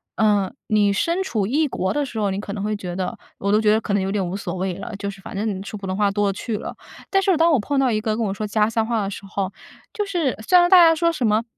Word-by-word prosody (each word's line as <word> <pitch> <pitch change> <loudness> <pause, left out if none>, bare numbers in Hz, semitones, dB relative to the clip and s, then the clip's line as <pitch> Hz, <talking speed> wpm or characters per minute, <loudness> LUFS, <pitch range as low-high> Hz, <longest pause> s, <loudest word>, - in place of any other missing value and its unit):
呃， 205 -3 +2
你 210 -2 +3
身 335 - 0
处 220 - -1
异 295 +8 +1
国 190 -6 -2
的 290 - 0
时 240 -4 -6
候， 205 -2 +1
你 195 - -2
可 205 - -6
能 200 - -4
会 215 0 -1
觉 180 -3 -6
得 185 -1 -3 0.2
我 200 - -1
都 215 +1 +4
觉 210 -1 +4
得 220 - +4
可 210 -2 -3
能 200 - +2
有 190 +1 -2
点 195 -3 -1
无 180 - -4
所 190 -2 -4
谓 185 0 -2
了， 195 - -6
就 200 - -5
是 195 0 -14
反 - - -9
正 200 -2 -2
说 210 +1 -7
普 195 - -8
通 185 0 -2
话 205 0 +2
多 205 +1 0
了 195 - 0
去 215 +2 -4
了。 - - -7 0.4
但 390 - +4
是 380 -4 +2
当 330 +1 +4
我 285 - +4
碰 275 +6 -1
到 260 -3 +3
一 215 - 0
个 215 0 -1
跟 230 - 0
我 195 - -1
说 210 +2 -4
家 210 +1 +2
乡 225 0 0
话 225 -3 0
的 195 - -2
时 - - -7
候， 195 -1 -3 0.4
就 415 - -1
是 345 -9 -1
虽 365 - +6
然 350 0 +6
大 370 - +7
家 325 -1 +6
说 335 +1 +2
什 255 -8 0
么 215 +2 +2
210 Hz, 335 characters per minute, -22 LUFS, 195-260 Hz, 0.4 s, 大